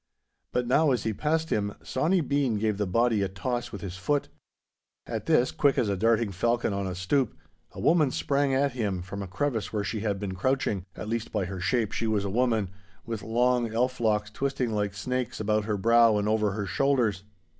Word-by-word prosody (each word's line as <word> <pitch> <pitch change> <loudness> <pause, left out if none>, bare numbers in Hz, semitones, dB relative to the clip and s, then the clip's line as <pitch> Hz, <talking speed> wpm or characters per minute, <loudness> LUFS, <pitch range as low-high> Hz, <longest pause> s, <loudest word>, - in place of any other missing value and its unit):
But 125 - 0
now, 145 +5 +3
as 125 -3 +1
he 110 - -1
passed 160 +7 -1
him, 100 -1 0
Sawny 170 +7 +1
Bean 140 -6 +1
gave 105 -1 0
the 105 - 0
body 115 +2 +2
a 100 - +1
toss 120 +6 -3
with 100 - -7
his 95 -2 -6
foot. 145 +9 0 0.8
At - - -5
this, 125 - +3
quick 140 -2 +2
as 110 - +2
a 100 - +1
darting 115 +1 +2
falcon 115 +3 0
on 100 0 -2
the 95 -1 -3
stoop, 110 +7 0 0.4
a - - -9
woman 155 -4 +4
sprang 140 +1 0
at 140 +1 +2
him 105 -7 -2
from, 100 +2 -6
a 100 - -5
crevice 110 +3 -2
where 105 -2 -1
she 105 +2 -3
had 105 -2 -1
been 100 -2 -4
crouching—at 100 -3 -2
least 115 0 -3
by 105 -4 -1
her 95 +1 -5
shape 110 +4 0
she 115 - -1
was 105 -2 0
a 100 - -2
woman, 110 -4 +1 0.3
with 115 -3 -4
long 120 +2 +1
elf 125 +3 0
locks 105 -2 +1
twisting 135 0 -1
like 105 -1 -1
snakes 125 +3 -3
about 105 0 +1
her 105 -1 -1
brow 115 +1 +5
and 105 0 0
over 105 -2 +1
her 105 0 -3
shoulders. 120 -6 +1
110 Hz, 210 wpm, -27 LUFS, 100-125 Hz, 0.8 s, brow